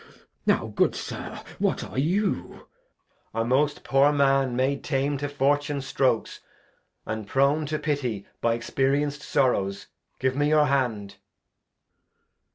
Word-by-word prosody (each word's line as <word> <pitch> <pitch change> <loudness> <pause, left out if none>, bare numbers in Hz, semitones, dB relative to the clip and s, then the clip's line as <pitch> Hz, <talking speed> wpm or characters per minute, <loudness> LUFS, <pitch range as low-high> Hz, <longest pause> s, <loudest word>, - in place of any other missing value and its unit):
Now, - - +3
good - - +2
Sir, - - -6 0.2
what - - 0
are - - -4
you? 175 - -1 0.7
Edg. 115 - +1
A - - 0
most 145 +4 +1
poor 135 +2 +4
Man 135 -3 +2
made 135 +2 0
tame 140 0 0
to 145 +1 -3
Fortune's 145 0 0
Strokes, 130 -4 0 0.7
And 110 -1 -4
prone 140 +5 +2
to 155 +1 -1
pity 130 -10 -2 0.2
by 115 0 +2
experienc'd 140 +4 0
Sorrows; 100 -11 0 0.3
give 130 0 0
me 145 +1 +2
your 155 -1 +5
Hand. 120 -8 -1
135 Hz, 130 wpm, -26 LUFS, 125-145 Hz, 0.7 s, your